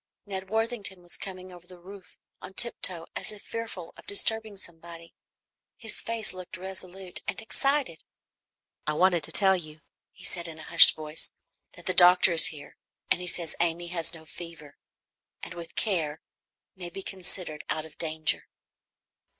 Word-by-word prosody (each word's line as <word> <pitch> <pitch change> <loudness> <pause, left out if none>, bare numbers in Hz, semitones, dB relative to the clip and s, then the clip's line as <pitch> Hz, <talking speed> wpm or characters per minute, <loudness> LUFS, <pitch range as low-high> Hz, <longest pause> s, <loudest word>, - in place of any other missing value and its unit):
Ned 190 -2 -6
Worthington 215 -4 -1
was 175 - -9
coming 185 -1 -7
over 175 0 -14
the 180 - -13
roof 190 +2 -13 0.2
on 190 - -10
tiptoe 185 -7 +2
as - - -1
if 210 -1 -11
fearful 225 -7 -6
of - - -15
disturbing 220 +1 0
somebody. 170 -1 -9 0.6
His 225 -3 -4
face 225 -3 +1
looked 185 -1 -8
resolute 185 0 -3
and - - -2
excited. 265 - 0 0.8
"I 150 - +1
wanted 175 0 +3
to 160 - -5
tell 190 +2 +4
you," 155 -3 -8 0.3
he 185 - -18
said 175 -3 -3
in 160 -1 -9
a 160 - -10
hushed - - +9
voice, 155 0 -4 0.4
"that 175 - -13
the 185 - +1
doctor 180 0 +7
is 165 - +10
here, 150 -2 -8 0.3
and - - +4
he 180 - -6
says 170 -2 -3
Amy 170 0 0
has 170 -2 -2
no 160 -1 -7
fever, 160 -3 -10 0.7
and - - -6
with 170 -1 -9
care 160 -8 0 0.6
may 180 -2 -6
be 195 +3 -8
considered 180 -5 -1
out 155 - -2
of 160 - -16
danger." 160 -1 0
180 Hz, 165 wpm, -28 LUFS, 165-195 Hz, 0.8 s, is